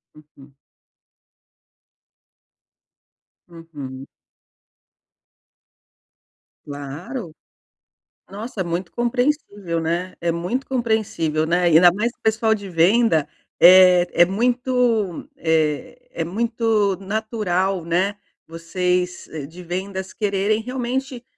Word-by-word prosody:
Uhum. 145 Hz, -2 st, -19 dB, 2.9 s
Uhum. 145 Hz, -6 st, -9 dB, 2.6 s
Claro. 155 Hz, -, -7 dB, 1.0 s
Nossa, 215 Hz, +2 st, -7 dB
é -, -, 0 dB
muito 170 Hz, +1 st, -4 dB
compreensível, 240 Hz, -, -1 dB
né. 175 Hz, +3 st, -2 dB
É 170 Hz, 0 st, 0 dB
muito 180 Hz, +11 st, -3 dB
compreensível, 215 Hz, -, -1 dB
né. 175 Hz, +2 st, +1 dB
Ainda 175 Hz, +1 st, +6 dB
mais 225 Hz, +6 st, -1 dB
que -, -, -38 dB
o -, -, -55 dB
pessoal 220 Hz, 0 st, +2 dB
de 200 Hz, -2 st, -7 dB
venda, 175 Hz, -1 st, +3 dB, 0.3 s
eh, 180 Hz, 0 st, +8 dB
é 175 Hz, -, +6 dB
muito, 240 Hz, -1 st, 0 dB
eh, 160 Hz, -, 0 dB
é -, -, -3 dB
muito 220 Hz, -1 st, 0 dB
natural, 195 Hz, -3 st, -1 dB
né, 185 Hz, +5 st, 0 dB, 0.3 s
vocês 180 Hz, +2 st, -2 dB, 0.2 s
de 180 Hz, +3 st, -12 dB
vendas 190 Hz, +2 st, -5 dB
quererem 205 Hz, +1 st, 0 dB
realmente, 250 Hz, +1 st, -4 dB
190 Hz, 90 wpm, -21 LUFS, 170-225 Hz, 2.9 s, eh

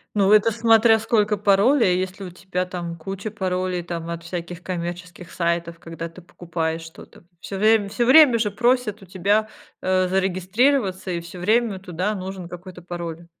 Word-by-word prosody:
Ну, 200 Hz, 0 st, +3 dB
это 215 Hz, +1 st, +5 dB
смотря 225 Hz, 0 st, +4 dB
сколько 215 Hz, -1 st, +1 dB
паролей. 200 Hz, 0 st, +3 dB
Если 190 Hz, +1 st, -5 dB
у 180 Hz, -, -7 dB
тебя, 180 Hz, 0 st, -3 dB
там, 175 Hz, -2 st, -6 dB
куча 195 Hz, +5 st, -6 dB
паролей, 185 Hz, -3 st, -2 dB
там, 170 Hz, -1 st, -6 dB
от 170 Hz, 0 st, -6 dB
всяких 175 Hz, 0 st, -6 dB
коммерческих 175 Hz, 0 st, -6 dB
сайтов. 170 Hz, -1 st, -2 dB
Когда 165 Hz, 0 st, -7 dB
ты 165 Hz, +2 st, -14 dB
покупаешь 165 Hz, -2 st, -4 dB
что-то, 165 Hz, +1 st, -14 dB, 0.2 s
всё 195 Hz, -, -6 dB
время 215 Hz, 0 st, +3 dB
всё 235 Hz, +4 st, -1 dB
время 265 Hz, -3 st, +7 dB
же 215 Hz, -2 st, 0 dB
просят 235 Hz, -1 st, 0 dB
у 195 Hz, -, -12 dB
тебя, 200 Hz, +4 st, +1 dB, 0.3 s
э, 185 Hz, 0 st, +1 dB
зарегистрироваться 190 Hz, +3 st, +1 dB
и 170 Hz, -1 st, -2 dB
всё 170 Hz, +2 st, -10 dB
время 215 Hz, 0 st, +1 dB
туда 185 Hz, +3 st, -3 dB
нужен 190 Hz, -2 st, -6 dB
какой-то 180 Hz, 0 st, -10 dB
пароль. 170 Hz, -1 st, -7 dB
185 Hz, 165 wpm, -22 LUFS, 175-210 Hz, 0.3 s, время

